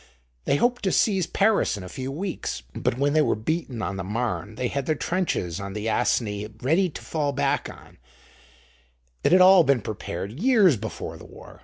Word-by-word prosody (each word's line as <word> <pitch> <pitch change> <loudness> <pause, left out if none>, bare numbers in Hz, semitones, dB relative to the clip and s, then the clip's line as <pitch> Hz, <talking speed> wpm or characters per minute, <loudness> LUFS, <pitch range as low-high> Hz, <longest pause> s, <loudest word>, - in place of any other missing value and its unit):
They - - +2
hoped 245 +10 +1
to 190 - +2
seize 190 -4 +2
Paris 200 - +2
in 100 - -8
a - - -7
few 130 +7 -5
weeks, 175 - -4
but 120 - -1
when 140 +2 +1
they 155 - +4
were - - +2
beaten 125 0 -3
on 100 - -3
the 95 - -4
Marne 110 +1 -3
they 125 - -1
had 140 +1 -3
their 155 - +2
trenches 145 - -2
on 100 0 -6
the 105 +2 -4
Aisne 105 -2 0 0.2
ready 170 +8 +2
to - - -9
fall 145 -3 -1
back 140 +1 0
on: - - -14 1.2
it - - +3
had 185 +1 +6
all 185 -1 +8
been 140 -5 +2
prepared 100 -2 -5
years 215 - +5
before 110 0 -6
the - - -13
war. - - -14
140 Hz, 195 wpm, -25 LUFS, 110-180 Hz, 1.2 s, all